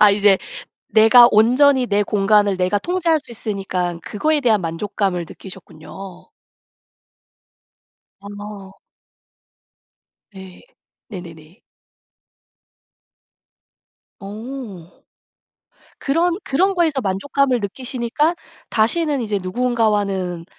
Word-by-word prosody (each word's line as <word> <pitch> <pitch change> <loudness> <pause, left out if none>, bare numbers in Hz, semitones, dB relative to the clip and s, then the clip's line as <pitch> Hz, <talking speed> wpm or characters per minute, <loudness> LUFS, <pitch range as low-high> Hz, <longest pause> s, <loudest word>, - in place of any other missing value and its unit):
아 210 -1 +7
이제 200 -1 +4 0.5
내가 225 +2 +7
온전히 255 +4 +4
내 205 -1 +1
공간을 205 -1 +2
내가 185 +3 0
통제할 345 - 0
수 260 - -17
있으니깐 190 -6 -4
그거에 300 - -1
대한 220 -6 +2
만족감을 180 +1 -2
느끼셨군요. 190 0 -12 1.9
어. 205 -1 -10 1.6
네. 190 -1 -12 0.5
네네네. 170 -1 -11 2.6
어. 210 -3 -8 1.1
그런 335 +5 0
그런 380 +8 +1
거에서 320 -6 +1
만족감을 255 +6 0
느끼시니까 250 - -2 0.4
다시는 280 +6 +1
이제 210 -3 -2
누군가와는 200 -5 -1
210 Hz, 200 characters per minute, -20 LUFS, 190-255 Hz, 2.6 s, 아